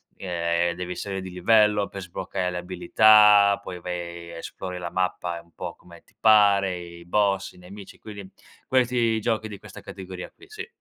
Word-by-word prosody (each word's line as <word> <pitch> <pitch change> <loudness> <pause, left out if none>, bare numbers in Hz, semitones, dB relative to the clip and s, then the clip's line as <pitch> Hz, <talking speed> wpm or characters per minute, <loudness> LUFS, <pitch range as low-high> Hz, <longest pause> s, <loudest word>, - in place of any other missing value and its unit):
ehm, 85 -1 -1
devi 90 0 -5
salir 95 -1 -5
di 95 - -7
livello 105 +2 +3
per 100 - -8
sbloccare 90 +1 -4
le 90 - -4
abilità, 100 +3 +5
poi 90 -2 -7
vai, 85 -1 -6
e 85 - -8
esplori 90 +1 -7
la 85 -1 -5
mappa, 90 -2 -2
ehm, 85 - -12
un 85 - -28
po' - - -7
come 85 -1 -17
ti 105 - -30
pare, 100 -4 +4
i 85 0 -11
boss, 100 +1 0
i 90 - -19
nemici, 95 +2 -12
quindi 100 -3 -10 0.4
questi 120 -3 +1
giochi 110 0 -1
di 100 -2 -9
questa - - -12
categoria 95 -1 -9
qui, 390 0 -19
sì. 430 +2 -8
95 Hz, 185 wpm, -24 LUFS, 90-105 Hz, 0.4 s, abilità